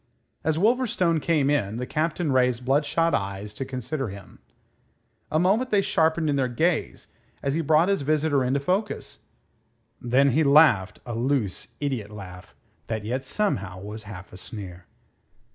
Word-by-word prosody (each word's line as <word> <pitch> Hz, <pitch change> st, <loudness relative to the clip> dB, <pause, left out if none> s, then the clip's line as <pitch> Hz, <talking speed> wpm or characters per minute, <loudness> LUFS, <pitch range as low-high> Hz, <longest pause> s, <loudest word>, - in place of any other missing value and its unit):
As 155 Hz, 0 st, +1 dB
Wolverstone 215 Hz, -5 st, +2 dB
came 150 Hz, -4 st, +2 dB
in, 110 Hz, -7 st, 0 dB
the 125 Hz, -, -3 dB
Captain 155 Hz, +2 st, -1 dB
raised 125 Hz, -1 st, +2 dB
bloodshot 150 Hz, +5 st, +2 dB
eyes 100 Hz, +1 st, -3 dB
to 105 Hz, -, -4 dB
consider 130 Hz, 0 st, -4 dB
him. 100 Hz, -2 st, -11 dB, 0.9 s
A 155 Hz, -, +1 dB
moment 200 Hz, +9 st, +2 dB
they 205 Hz, -3 st, +3 dB
sharpened 160 Hz, -1 st, +2 dB
in 145 Hz, -1 st, +1 dB
their 130 Hz, -2 st, +1 dB
gaze 160 Hz, +7 st, -1 dB, 0.3 s
as 140 Hz, -, 0 dB
he 165 Hz, -, 0 dB
brought 160 Hz, +2 st, +3 dB
his 200 Hz, -3 st, +1 dB
visitor 145 Hz, -1 st, +1 dB
into 130 Hz, +3 st, +1 dB
focus. 190 Hz, +9 st, -2 dB, 0.8 s
Then 130 Hz, +3 st, +3 dB
he 160 Hz, +5 st, +3 dB
laughed, 140 Hz, -10 st, +5 dB
a 120 Hz, -, -5 dB
loose, 120 Hz, -4 st, -1 dB
idiot 130 Hz, -8 st, -2 dB
laugh, 95 Hz, -3 st, -11 dB, 0.3 s
that 110 Hz, -2 st, -3 dB
yet 130 Hz, +4 st, -2 dB
somehow 100 Hz, -, -1 dB
was 105 Hz, +3 st, -7 dB
half 90 Hz, -3 st, -10 dB
a -, -, -9 dB
sneer. 90 Hz, -3 st, -8 dB
135 Hz, 155 wpm, -25 LUFS, 110-160 Hz, 0.9 s, laughed